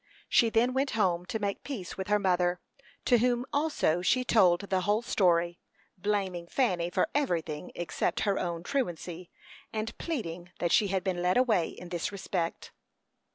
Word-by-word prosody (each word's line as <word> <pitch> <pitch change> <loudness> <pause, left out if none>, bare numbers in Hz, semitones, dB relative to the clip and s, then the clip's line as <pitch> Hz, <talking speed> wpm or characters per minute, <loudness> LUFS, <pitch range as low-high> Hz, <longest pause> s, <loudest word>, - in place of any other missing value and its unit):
She 230 - +4
then 235 +3 +2
went 270 +1 +1
home 180 -4 +1
to - - -2
make 200 -2 -3
peace 220 -11 -6
with 190 - -5
her 210 0 +3
mother, 180 -2 +1 0.5
to 245 -2 +5
whom 245 +1 +1
also 285 - +1
she 255 +8 +2
told 185 -8 +4
the 190 -2 -1
whole 210 +4 +1
story, 175 -6 +2 0.4
blaming 190 -3 -2
Fanny 180 -8 +1
for - - +1
everything 170 - -1
except 175 -2 -1
her 200 -2 +1
own 170 -2 -3
truancy, 180 -9 -3 0.4
and 220 +1 -3
pleading 180 - -4
that 175 - -1
she 210 - +4
had 190 -1 -1
been 185 -2 -1
led 180 +3 +2
away 225 -9 +3
in 180 - -10
this 175 +2 -2
respect. 185 -4 -3
190 Hz, 165 wpm, -29 LUFS, 175-225 Hz, 0.5 s, to